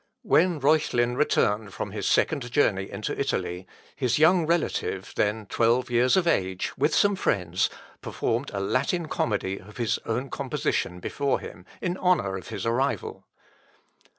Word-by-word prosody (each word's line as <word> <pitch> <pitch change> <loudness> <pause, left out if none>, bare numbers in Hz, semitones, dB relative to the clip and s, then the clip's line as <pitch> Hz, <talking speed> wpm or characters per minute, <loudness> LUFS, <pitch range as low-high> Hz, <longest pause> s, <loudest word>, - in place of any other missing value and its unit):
When 170 -1 +3
Reuchlin 135 -5 +2
returned 105 -7 +1
from - - -4
his - - -3
second 125 -3 +1
journey 100 -8 +2
into 100 +1 -4
Italy, 90 +1 -2 0.3
his 125 -4 +1
young 160 +2 +4
relative, 170 0 -1
then 105 +1 0
twelve 120 +4 +1
years 125 +6 +4
of 185 - +2
age, 95 - 0
with 150 +3 +1
some 200 0 +4
friends, 90 - 0 0.3
performed 120 +5 -2
a 100 - -3
Latin 140 - 0
comedy 100 -7 -1
of 105 +3 -14
his 120 -2 0
own 125 +4 -2
composition 90 - -2
before 140 +6 -1
him, 90 +1 -11
in 180 0 -2
honour 175 - +1
of 95 - -7
his - - -5
arrival. 130 +5 -1
120 Hz, 150 wpm, -26 LUFS, 100-150 Hz, 0.3 s, young